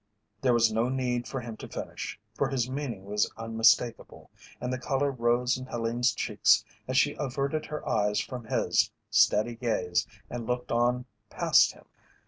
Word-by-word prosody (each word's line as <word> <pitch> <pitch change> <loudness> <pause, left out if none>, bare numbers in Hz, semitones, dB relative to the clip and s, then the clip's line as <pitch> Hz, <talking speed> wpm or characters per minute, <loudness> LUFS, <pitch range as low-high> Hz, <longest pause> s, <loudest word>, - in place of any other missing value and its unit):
There 125 -2 +3
was 115 -1 +3
no 115 +3 +1
need 125 -2 -1
for 135 - -4
him 115 -2 -7
to - - -8
finish, - - -6
for - - 0
his 125 -3 0
meaning 130 -7 -4
was 105 +1 0
unmistakable, 115 +1 +1 0.3
and 125 +1 -3
the 130 - -3
colour 140 +2 0
rose 120 0 +1
in 130 - -8
Helene's 120 +1 0
cheeks 105 -1 +2 0.2
as 130 0 0
she 145 +2 +4
averted 140 +2 -2
her 150 0 -6
eyes 105 -1 +1
from 125 -3 -5
his - - +1 0.2
steady 110 +3 +4
gaze 110 -4 0 0.2
and 120 -2 -6
looked 125 0 -2
on 120 +1 +1 0.2
past - - +4
him. - - -19
120 Hz, 165 wpm, -28 LUFS, 115-130 Hz, 0.3 s, she